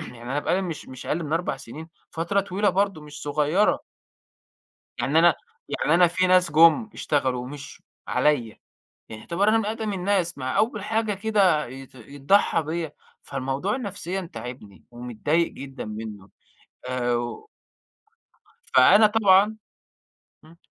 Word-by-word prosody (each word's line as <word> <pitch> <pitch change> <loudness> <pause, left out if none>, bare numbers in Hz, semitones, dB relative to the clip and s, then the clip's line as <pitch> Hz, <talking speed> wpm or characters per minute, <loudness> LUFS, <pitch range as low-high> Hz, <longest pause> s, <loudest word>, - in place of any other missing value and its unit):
يعني 120 -1 -10
أنا 135 +4 -2
بقى - - 0
لي 190 - 0
مش 170 -4 -6
مش 130 -1 -10
أقل 165 +1 -1
من 150 - -5
4 165 -4 -1
سنين 155 +8 -10 0.2
فترة 170 +5 0
طويلة 200 +2 0
برضو 195 -3 0
مش 150 -1 -11
صغيّرة. 150 +7 +1 1.2
يعني 150 +4 +2
أنا 170 +1 +6 0.3
يعني 160 - 0
أنا 175 0 +6
فيه 185 +2 +1
ناس 180 -2 +4
جُم 165 +8 +5
اشتغلوا 130 -4 -1
ومشيوا 140 +2 -10 0.2
عليَّ، 145 -7 +2 0.6
يعني 110 -1 -9
يُعتبر 195 +5 0
أنا 225 - +4
من 220 - -2
أقدَم 220 -1 -3
الناس 185 -3 -1
مع 130 -1 -3
أوّل 215 -2 0
حاجة 220 -1 0
كده 195 -6 +2
يت 130 +2 -11
يتضحى 140 - +1
بيّا 160 +1 -4 0.3
فالموضوع 135 - -3
نفسيًا 190 -6 -5
تاعبني، 105 -8 -9
ومتضايق 125 +8 -1
جدًا 135 -1 -8
منّه 105 -2 -8 0.6
آآ 125 -1 0
و 120 - -5 1.3
فأنا 215 +1 +7
طبعًا 210 0 +4 0.9
امم، 165 +2 -18
165 Hz, 140 wpm, -24 LUFS, 135-195 Hz, 1.3 s, فأنا